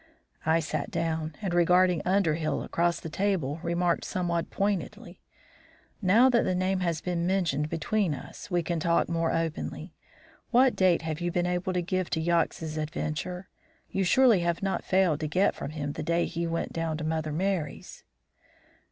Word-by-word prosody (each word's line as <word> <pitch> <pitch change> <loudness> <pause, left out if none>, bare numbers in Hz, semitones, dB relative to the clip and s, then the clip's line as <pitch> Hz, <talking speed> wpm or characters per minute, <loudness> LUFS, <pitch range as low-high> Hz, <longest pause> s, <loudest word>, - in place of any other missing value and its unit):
I 160 +1 +4
sat 155 -2 -3
down 160 -2 -2
and, 185 -3 -1
regarding 180 0 +4
Underhill 165 -5 +1
across 170 0 0
the - - -7
table, 165 -4 -1
remarked 175 0 0
somewhat 170 -2 -2
pointedly: 200 -2 -3 0.8
"Now 215 +7 +5
that 240 -3 +4
the 185 - 0
name 185 +1 0
has 170 -3 -1
been 175 -1 -1
mentioned 165 -6 0
between 170 +1 0
us, 130 - -10
we 175 -2 +1
can 170 0 -2
talk 170 +1 +2
more 165 -1 0
openly. 165 -1 -3 0.6
What 255 +1 +4
date 180 -3 +3
have 160 0 -4
you 175 0 -1
been 175 +1 0
able 180 +1 -1
to 180 -1 0
give 185 0 -1
to 160 - -1
Yox's 160 -1 0
adventure? 155 +4 -4 0.4
You 195 - 0
surely 235 +2 +5
have 170 +1 -1
not 195 -1 -1
failed 185 -6 +2
to 155 - -2
get 185 +6 +2
from - - -6
him 145 -2 -4
the 155 - -5
day 170 +2 +1
he 170 0 -3
went 165 0 -3
down 165 -2 -2
to 155 - -5
Mother 155 -1 -1
Merry's?" 170 -2 -3
170 Hz, 170 wpm, -28 LUFS, 160-185 Hz, 0.8 s, Now